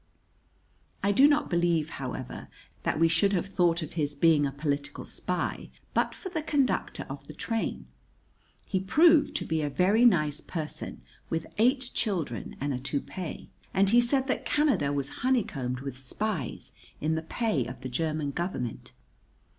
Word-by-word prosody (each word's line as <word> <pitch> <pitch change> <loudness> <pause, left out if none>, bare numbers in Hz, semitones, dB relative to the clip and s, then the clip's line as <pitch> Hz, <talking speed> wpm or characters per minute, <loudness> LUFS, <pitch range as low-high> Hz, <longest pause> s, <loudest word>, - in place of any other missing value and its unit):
I 200 - +3
do 265 +8 +7
not 295 0 +2
believe, 170 -3 +1
however, 130 -1 -5 0.3
that - - -1
we 165 - +6
should 170 +5 +3
have 180 -2 +1
thought 175 -4 +2
of 155 - -7
his 145 -3 -1
being 150 -1 +4
a - - -4
political 140 0 -3
spy - - -3 0.2
but - - +1
for 375 - -6
the 335 -3 -2
conductor 285 -4 0
of - - -8
the - - -9
train. 225 -1 -2 0.8
He 190 - 0
proved 305 - +5
to - - 0
be 160 -1 0
a 145 - 0
very 195 - +3
nice 155 -10 +4
person, 155 -3 -5 0.3
with 165 0 -1
eight 255 +2 +3
children 170 - -2
and 140 +1 -1
a 125 - -2
toupee; 145 +6 -4 0.2
and 195 +1 +4
he 240 +1 +7
said 260 +2 +2
that 265 - -1
Canada 290 - +2
was 140 -1 -1
honeycombed 140 - 0
with 135 -2 -6
spies 160 - -3 0.3
in 155 +2 0
the 160 - -1
pay 165 - -1
of 125 +1 -8
the 130 - -4
German 155 +2 -1
Government. 140 - -4
165 Hz, 160 wpm, -28 LUFS, 145-225 Hz, 0.8 s, do